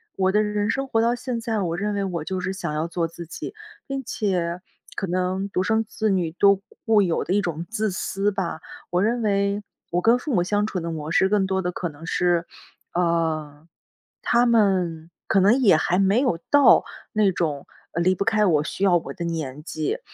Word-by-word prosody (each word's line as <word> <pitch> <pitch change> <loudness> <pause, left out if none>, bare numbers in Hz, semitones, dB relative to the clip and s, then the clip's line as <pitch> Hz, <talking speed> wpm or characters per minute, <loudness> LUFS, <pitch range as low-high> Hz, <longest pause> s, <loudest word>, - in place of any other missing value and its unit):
我 190 0 +2
的 210 - +3
人 210 0 -1
生 270 0 -2
活 225 -3 +1
到 235 +1 +2
现 245 -1 -4
在， 225 -2 -2
我 170 -2 -1
认 205 +2 -1
为 200 -1 -1
我 175 -5 -3
就 185 +2 -3
是 185 +1 -2
想 170 -5 -4
要 155 +2 -1
做 170 -1 -1
自 170 0 -10
己。 390 - -7 0.3
并 275 -1 -4
且， 180 -7 -1 0.4
可 - - -2
能 185 +2 -1
独 185 - 0
生 220 +3 +1
子 220 0 -2
女 180 -4 0
都 200 -1 +5 0.3
固 215 -2 +5
有 170 -3 0
的 180 - -1
一 205 - +3
种 165 -1 -3
自 215 -2 -1
私 195 +2 -1
吧， 175 -4 -3 0.3
我 180 +2 +1
认 235 +2 +1
为， 200 -1 +1 0.3
我 175 +1 +1
跟 230 +4 +5
父 270 +1 -4
母 180 - +3
相 205 +2 +1
处 195 -4 -3
的 170 0 -4
模 155 0 -5
式 190 +2 +3
更 205 -2 +2
多 190 0 0
的 180 0 -2
可 175 -1 -4
能 155 +2 -12
是， 175 -1 +1 0.5
呃， 160 -3 -1 0.6
他 240 +1 +3
们， 185 -7 +1 0.2
可 195 - +3
能 205 +6 +5
也 195 -9 +6
还 180 +4 +1
没 195 +4 +3
有 175 -12 0
到 285 -1 +6 0.3
那 210 -3 +3
种 155 -5 -2 0.3
离 175 +3 +2
不 200 - -2
开 215 -1 +3
我、 155 -5 +3
需 190 - -4
要 180 -3 +5
我 165 - -6
的 170 - -6
年 150 -4 -4
纪， 155 -2 -3
190 Hz, 225 characters per minute, -23 LUFS, 170-210 Hz, 0.6 s, 也